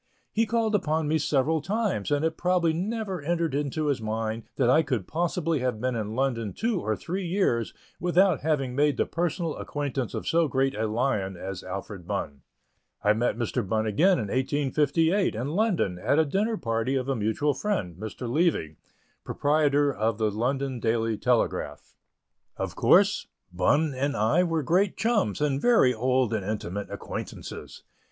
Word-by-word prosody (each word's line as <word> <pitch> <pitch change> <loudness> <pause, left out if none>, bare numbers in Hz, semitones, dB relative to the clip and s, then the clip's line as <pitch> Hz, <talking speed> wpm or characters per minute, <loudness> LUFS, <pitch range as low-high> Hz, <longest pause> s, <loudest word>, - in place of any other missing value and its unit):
He 225 +1 +1
called 225 -1 +1
upon 160 -5 +1
me 160 +1 +2
several 150 +2 +1
times, 200 - -1
and 145 +1 +1
it 160 0 0
probably 175 -2 +1
never 195 0 -3
entered 165 0 -1
into 145 +2 -1
his 140 -5 0
mind 110 +1 -3
that 130 - +2
I 140 +6 +5
could 130 - -2
possibly 165 - -1
have 125 -3 -1
been 125 +1 -1
in 110 -1 -3
London 115 -6 -1
two 220 -5 -1
or 110 - -1
three 185 - -4
years 170 - 0 0.3
without 180 -2 +3
having 140 -4 0
made 145 -1 +2
the - - +2
personal 170 -1 -2
acquaintance 140 -4 -3
of - - -5
so 165 -1 +3
great 135 0 +1
a 110 +1 -1
lion 105 -5 -1
as 95 0 -6
Alfred 95 -1 -7
Bunn. 70 -2 -4 0.6
I 105 - +5
met 115 +1 0
Mr. 120 -2 -1
Bunn 110 +2 0
again 155 - +3
in 105 -4 -3
1858, 150 - +1
in 125 +6 -3
London, 170 - 0
at 140 - +1
a 160 - +4
dinner 210 +9 0
party 115 - -1
of 130 -1 -1
a 135 - 0
mutual 115 +7 0
friend, 130 - -2
Mr. 110 +6 -6
Levy, 125 - 0 0.5
proprietor 145 -1 +2
of 110 -1 0
the 110 -2 +1
London 130 +4 -1
Daily 115 -1 0
Telegraph. - - -1 0.6
Of - - -4
course, - - +4 0.3
Bunn 145 - +2
and 140 +2 -1
I 110 +12 +3
were 165 -3 0
great 180 +7 +2
chums 220 - +1
and 140 -2 +1
very 230 - +5
old 125 0 +1
and 110 -3 -1
intimate 100 -1 -4
acquaintances. - - -7
140 Hz, 170 wpm, -26 LUFS, 110-165 Hz, 0.6 s, I